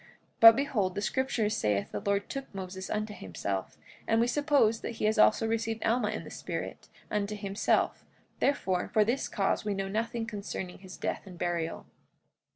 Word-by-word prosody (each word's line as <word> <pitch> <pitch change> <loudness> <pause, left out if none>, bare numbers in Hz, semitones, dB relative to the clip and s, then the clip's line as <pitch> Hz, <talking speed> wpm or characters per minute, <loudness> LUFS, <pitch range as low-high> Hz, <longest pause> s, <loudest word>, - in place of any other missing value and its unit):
But 225 0 +11
behold, 220 -10 0
the 205 - -2
scriptures 230 -4 0
saith 105 -2 0
the 105 - -3
Lord 200 - 0
took 275 0 -6
Moses 190 0 -6
unto 215 0 -2
himself; 95 - -4 0.3
and 225 - +3
we 235 - +4
suppose 250 -4 +2
that 235 - -5
he - - -1
has 215 +1 +2
also 220 +1 +5
received 225 0 -1
Alma 225 -1 +2
in - - -4
the - - -10
spirit, - - -5 0.2
unto 210 0 -1
himself; 200 0 0 0.4
therefore, 190 -10 +1
for 215 -3 +4
this 240 +5 0
cause 195 -1 0
we 205 -1 -1
know 195 0 -2
nothing 225 +2 -2
concerning 200 -4 -5
his 190 -1 -11
death - - -3
and 180 -2 -10
burial. 170 -2 -2
210 Hz, 175 wpm, -30 LUFS, 190-230 Hz, 0.4 s, But